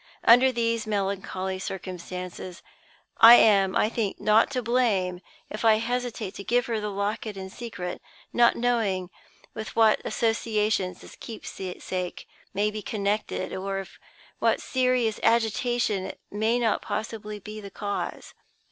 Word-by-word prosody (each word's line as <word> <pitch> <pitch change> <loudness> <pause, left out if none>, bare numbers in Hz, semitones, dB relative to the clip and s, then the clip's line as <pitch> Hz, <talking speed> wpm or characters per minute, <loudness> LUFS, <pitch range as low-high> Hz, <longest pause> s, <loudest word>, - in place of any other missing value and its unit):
Under 250 +3 +7
these 230 -2 -1
melancholy 190 -2 -2
circumstances, 180 -1 -6 0.5
I 230 +1 +11
am, 195 -4 +5
I - - +3
think, 220 -3 -2
not 215 +1 +4
to 255 -2 -2
blame 210 -7 +1 0.3
if 215 - -5
I 220 -1 +6
hesitate 235 -2 -3
to 200 - -8
give 245 +4 +1
her 230 -3 -1
the 210 0 -3
locket 205 +1 -3
in 190 0 -7
secret; 210 -7 -6 0.3
not 240 0 +5
knowing 215 -7 0 0.4
with 220 -1 -7
what 220 -1 +4
associations 215 -5 0
this - - -13
keepsake 185 -4 -6 0.2
may 205 +2 0
be 215 0 -5
connected, 205 -2 -2
or 195 +1 -3
of 195 -1 -8 0.4
what - - +2
serious 250 -4 +1
agitation 230 -3 +1
it - - -8
may 220 +3 +1
not 230 -3 +1
possibly 215 0 -4
be 215 +1 -8
the 200 - -8
cause. 205 +1 -5
215 Hz, 140 wpm, -26 LUFS, 195-230 Hz, 0.5 s, I